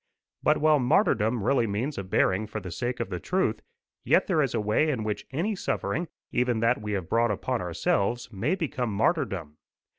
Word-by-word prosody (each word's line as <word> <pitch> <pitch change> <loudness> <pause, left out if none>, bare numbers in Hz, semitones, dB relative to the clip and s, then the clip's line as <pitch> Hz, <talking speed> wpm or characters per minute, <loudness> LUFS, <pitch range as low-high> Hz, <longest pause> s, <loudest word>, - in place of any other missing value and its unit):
But - - +3
while 155 -1 +4
martyrdom 120 - +2
really 120 0 +2
means 115 +9 -2
a - - -3
bearing 95 +2 +1
for 110 0 -5
the 90 -3 -8
sake 120 +7 -3
of 95 - -3
the 90 - -3
truth, 190 - 0 0.4
yet - - +3
there 165 -5 +2
is 135 -4 0
a - - +1
way 105 +9 +2
in 125 -7 -1
which 105 -1 -3
any 175 +11 -1
suffering, 165 - -2 0.2
even 125 -2 +1
that 115 -1 +2
we 105 0 -3
have 95 -4 -2
brought 115 +1 +2
upon 120 +4 -1
ourselves, 100 +6 0
may 115 - 0
become 130 - -2
martyrdom. 100 - 0
115 Hz, 190 wpm, -27 LUFS, 100-140 Hz, 0.4 s, while